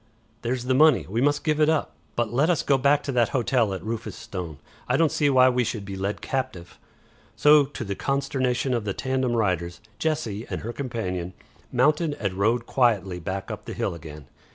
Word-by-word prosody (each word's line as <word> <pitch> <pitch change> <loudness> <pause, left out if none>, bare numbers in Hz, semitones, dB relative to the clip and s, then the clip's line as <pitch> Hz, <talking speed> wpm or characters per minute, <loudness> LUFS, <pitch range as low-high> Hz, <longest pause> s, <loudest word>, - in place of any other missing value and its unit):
There's 120 +1 -2
the 130 +1 +1
money. 150 0 +5
We 110 +6 -1
must 145 +1 +2
give 155 -2 +1
it 155 0 +4
up. 160 -2 0 0.2
But 120 -1 -1
let 145 +7 +3
us 170 -5 +2
go 140 -2 +3
back 140 +2 +3
to 140 - -3
that 120 -3 +2
hotel 120 -3 +1
at 95 - -5
Rufus 110 -2 -4
Stone. 85 -6 -6 0.3
I - - +3
don't 160 -2 +3
see 145 -2 +2
why 130 -2 +6
we 125 0 +1
should 110 -3 -4
be 100 0 -6
led 95 +2 -3
captive." 105 -10 -4 0.6
So 150 -1 +6
to 135 -3 -7
the 100 -3 -3
consternation 135 0 -1
of 120 -3 0
the 100 -2 -3
tandem 130 -2 -1
riders, 90 -5 0 0.2
Jessie 120 -9 -2
and - - -4
her 120 +2 -5
companion 95 -10 -4 0.4
mounted 150 +4 +2
and 100 -7 -3
rode 110 +5 +1
quietly 100 -9 +1
back 95 +3 -4
up - - -7
the - - -6
hill - - -1
again. 75 -3 -10
120 Hz, 200 wpm, -25 LUFS, 100-140 Hz, 0.6 s, why